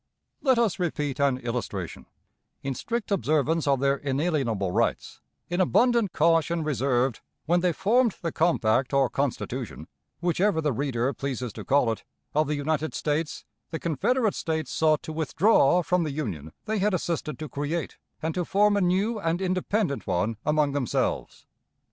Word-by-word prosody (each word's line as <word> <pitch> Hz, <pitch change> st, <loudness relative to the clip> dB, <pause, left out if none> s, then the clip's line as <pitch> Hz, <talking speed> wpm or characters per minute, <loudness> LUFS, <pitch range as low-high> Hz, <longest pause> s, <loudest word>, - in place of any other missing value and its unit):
Let 260 Hz, -4 st, +3 dB
us 225 Hz, -5 st, +1 dB
repeat 150 Hz, -6 st, -2 dB
an 140 Hz, -2 st, +3 dB
illustration: 115 Hz, -8 st, -4 dB, 0.6 s
In 135 Hz, -, -2 dB
strict 230 Hz, -, -4 dB
observance 155 Hz, -3 st, +1 dB
of 140 Hz, -2 st, +3 dB
their 140 Hz, +1 st, +2 dB
inalienable 135 Hz, -, -1 dB
rights, -, -, -1 dB, 0.3 s
in 175 Hz, +2 st, 0 dB
abundant 235 Hz, +1 st, +3 dB
caution 165 Hz, +1 st, +2 dB
reserved, 130 Hz, -4 st, 0 dB, 0.2 s
when 175 Hz, +3 st, +3 dB
they 180 Hz, 0 st, +2 dB
formed 220 Hz, +6 st, +2 dB
the 165 Hz, -, -1 dB
compact 135 Hz, -7 st, +2 dB
or 135 Hz, -3 st, +3 dB
Constitution 125 Hz, -, -3 dB, 0.3 s
whichever 175 Hz, +1 st, +1 dB
the 150 Hz, -3 st, 0 dB
reader 130 Hz, 0 st, -1 dB
pleases 125 Hz, -3 st, -4 dB
to -, -, -7 dB
call 135 Hz, -4 st, +3 dB
it 110 Hz, -, -5 dB, 0.3 s
of 155 Hz, 0 st, +2 dB
the 150 Hz, -, 0 dB
United 155 Hz, +2 st, -1 dB
States, 150 Hz, +1 st, -2 dB, 0.2 s
the 160 Hz, -, -3 dB
Confederate 210 Hz, -, +1 dB
States 160 Hz, -1 st, -2 dB
sought 155 Hz, -1 st, +2 dB
to 160 Hz, -2 st, -6 dB
withdraw 165 Hz, +1 st, +3 dB
from 180 Hz, +3 st, +1 dB
the 160 Hz, -, -1 dB
Union 95 Hz, -, -4 dB
they 220 Hz, -1 st, -1 dB
had 200 Hz, 0 st, +2 dB
assisted 160 Hz, -5 st, -2 dB
to 155 Hz, -, -5 dB
create, 145 Hz, +4 st, -3 dB, 0.2 s
and 160 Hz, 0 st, -1 dB
to 180 Hz, -, -1 dB
form 205 Hz, +4 st, +3 dB
a 200 Hz, -, +2 dB
new 195 Hz, +5 st, +1 dB
and 165 Hz, -2 st, 0 dB
independent 185 Hz, -3 st, -1 dB
one 100 Hz, +6 st, 0 dB
among 150 Hz, -1 st, +2 dB
themselves. 140 Hz, -4 st, -2 dB
155 Hz, 160 wpm, -26 LUFS, 135-180 Hz, 0.6 s, Let